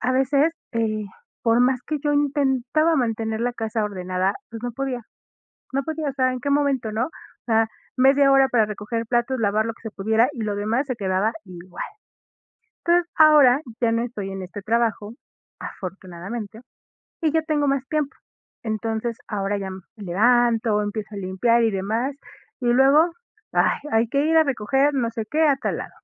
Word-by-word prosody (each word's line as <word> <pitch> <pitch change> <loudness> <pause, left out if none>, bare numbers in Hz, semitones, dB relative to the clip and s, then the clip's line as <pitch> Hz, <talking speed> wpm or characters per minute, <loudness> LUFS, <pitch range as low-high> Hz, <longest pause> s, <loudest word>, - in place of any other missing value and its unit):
a 255 - 0
veces, 280 +4 +2 0.2
eh, 220 -2 -1 0.4
por 230 +1 +3
más 250 0 +3
que 305 0 -2
yo 290 +1 0
intentaba 290 +2 +2
mantener 225 -3 -1
la 245 +1 -1
casa 225 -1 -2
ordenada, 185 -1 -1 0.2
pues, 225 -1 -8
no 245 0 -3
podía. 260 0 -3 0.7
No 275 - +1
podía, 315 0 -3
o - - -2
sea, 255 -1 +2
en 255 - -5
qué 285 - -3
momento, 280 -5 +1
¿no? 230 +3 0
O - - -10 0.4
sea, 225 -1 +3 0.3
media 275 +1 +5
hora 270 0 +5
para 240 -4 +3
recoger 210 +2 -4
platos, 240 +2 0
lavar 215 0 +1
lo 230 - -3
que - - -23
se 220 - -6
pudiera, 220 +4 +2
y 255 - -8
lo 210 -1 -1
demás 225 +7 0
se 255 -3 -3
quedaba 195 +1 0
igual. 180 -1 -8 1.0
Entonces, 345 0 +2
ahora 295 -5 +7 0.2
ya 230 - +3
no 230 +1 +1
estoy 205 -5 -5
en 195 0 -5
este 185 +3 -8
trabajo, 220 0 0 0.5
afortunadamente, 195 +4 -7 0.6
y 320 - +2
ya 320 0 +2
tengo 300 -3 0
más 275 -1 0
tiempo. 300 -3 -2 0.5
Entonces, 225 +1 -2
ahora 200 -1 -1
ya 195 - -4
me 190 0 -8 0.2
levanto, 225 +2 +2
empiezo 210 0 -5
a - - -5
limpiar 200 +5 +2
y 225 - +3
demás, 220 +7 -2 0.5
y 245 - -2
luego, 275 +7 +5 0.4
ay, - - +2
hay 225 +1 +3
que 280 +3 +1
ir 320 +1 +2
a 320 - +6
recoger 270 +3 +1
no 240 -4 0
sé 225 -1 -4
qué 310 +1 +2
a 280 - +3
tal - - -2
lado. - - -6
235 Hz, 180 wpm, -23 LUFS, 215-275 Hz, 1.0 s, ahora